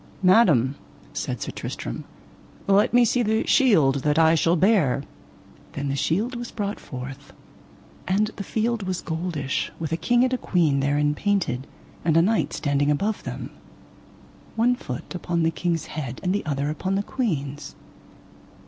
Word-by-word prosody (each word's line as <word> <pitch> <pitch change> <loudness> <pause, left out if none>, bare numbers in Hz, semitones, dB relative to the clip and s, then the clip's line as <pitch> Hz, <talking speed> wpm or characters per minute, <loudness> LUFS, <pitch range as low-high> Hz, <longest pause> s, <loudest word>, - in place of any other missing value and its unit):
Madam, 175 - +5 0.4
said - - -3
Sir - - -5
Tristram, - - -6 0.6
let 200 +1 +4
me 245 0 +5
see 245 +2 +2
the 220 -1 +1
shield 160 - +4
that 150 +2 +1
I 160 0 +5
shall 165 +1 +3
bear. 165 - +3 0.7
Then 140 0 -3
the 135 - -1
shield 200 - 0
was 240 0 -5
brought 205 -2 -4
forth, 135 +2 -8 0.7
and 210 +3 +1
the 200 - -5
field 225 +3 -1
was 185 -2 -3
goldish, 160 -4 -2
with 160 -1 -4
a 165 - 0
king 240 +6 +3
and 255 0 +1
a 255 - 0
queen 160 -7 +2
therein 145 +1 +1
painted, 170 -8 -1 0.4
and 160 -1 +3
a - - +7
knight 220 +4 +1
standing 145 0 0
above 200 +9 0
them, - - -6 1.0
[one 240 +2 +3
foot] 125 - -7
upon 175 -2 -1
the 165 - +2
king's 165 0 -1
head, 135 -5 -5
and 180 0 +1
the 205 - -1
other 145 0 -1
upon 190 +5 -2
the 200 - 0
queen's. 145 - -3
170 Hz, 160 wpm, -24 LUFS, 145-210 Hz, 1.0 s, a